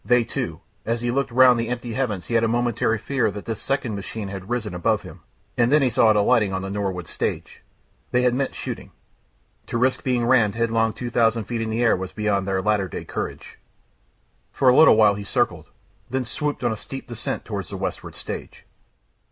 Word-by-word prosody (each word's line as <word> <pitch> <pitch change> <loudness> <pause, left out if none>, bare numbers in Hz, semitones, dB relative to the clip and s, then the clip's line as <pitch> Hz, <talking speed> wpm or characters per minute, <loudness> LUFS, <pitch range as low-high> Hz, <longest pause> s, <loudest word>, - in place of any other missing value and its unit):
"They 125 +3 +4
too 115 - -4
." 100 - -41
As 115 0 0
he 120 0 0
looked 140 +2 0
round 125 0 +6
the 115 0 -2
empty 120 -1 -4
heavens 110 -8 -2
he - - -5
had 115 -1 +3
a - - +3
momentary 120 -1 +1
fear 125 0 0
that 105 0 -7
this 115 - -4
second 135 -5 -1
machine 100 +1 -5
had 95 0 -7
risen 120 -5 -2
above 90 -1 0
him, - - -11 0.4
and 120 +1 +2
then 150 -1 +5
he 130 - +2
saw 115 0 +4
it 110 - +4
alighting 105 -1 +3
on 95 0 -2
the 95 - -4
Norwood 95 -3 -2
stage. - - -4 0.5
They 125 0 +2
had 125 -1 +3
meant 135 +2 -1
shooting. - - -6 0.7
To - - -2
risk 130 +2 +1
being 125 -2 +1
rammed 115 -4 +3
headlong 115 -1 +1
two 120 -1 -5
thousand 115 -1 +2
feet 115 +1 -3
in 115 - -2
the 115 +2 0
air 115 - +4
was 95 0 -6
beyond 100 -3 0
their 95 -1 0
latter 105 -2 +1
day - - -7
courage.... - - -6 0.9
For 130 - +3
a 125 - +5
little 160 - +8
while 105 -2 +5
he 100 0 -6
circled, 100 - -1 0.4
then 130 0 -1
swooped 145 +3 -3
in 120 - +2
a - - -2
steep 135 +5 -8
descent 120 -1 -4
towards 100 -6 -5
the - - -5
westward - - -5
stage. - - -7
115 Hz, 215 wpm, -23 LUFS, 105-125 Hz, 0.9 s, little